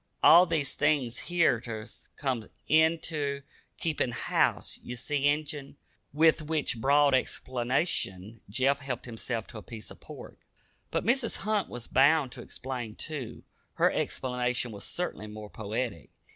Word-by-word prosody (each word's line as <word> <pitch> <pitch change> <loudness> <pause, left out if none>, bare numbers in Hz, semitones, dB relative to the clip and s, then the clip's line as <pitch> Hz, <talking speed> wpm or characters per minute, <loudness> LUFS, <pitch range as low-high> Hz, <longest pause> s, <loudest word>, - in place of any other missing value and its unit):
All 175 +3 +9
these 155 -5 0
things 145 -4 0
hez 165 -9 +3
ter 110 -2 -5 0.3
come 130 -6 -2 0.2
inter 155 -3 +2 0.3
keepin' 155 -6 0
house, 120 - 0
ye 125 - -6
see, 145 +3 0
Injun." 145 -1 -2 0.3
With 160 +2 +4
which 150 -7 -1
broad 140 +1 +5
explanation 120 - -1
Jeff 135 +6 +2
helped 130 -3 -5
himself 115 -1 -3
to 110 - -7
a - - -10
piece 110 -1 -9
of - - -12
pork. - - -11 0.5
But - - -1
Mrs. 240 -1 +2
Hunt 215 -2 +1
was 120 -1 -6
bound 140 0 +4
to - - -7
explain 125 -4 -6
too. 145 -7 -5 0.3
Her - - +3
explanation 125 -1 -1
was 100 -2 -7
certainly 175 -11 -3
more 105 0 -9
poetic. 110 - -4
135 Hz, 140 wpm, -29 LUFS, 115-155 Hz, 0.5 s, All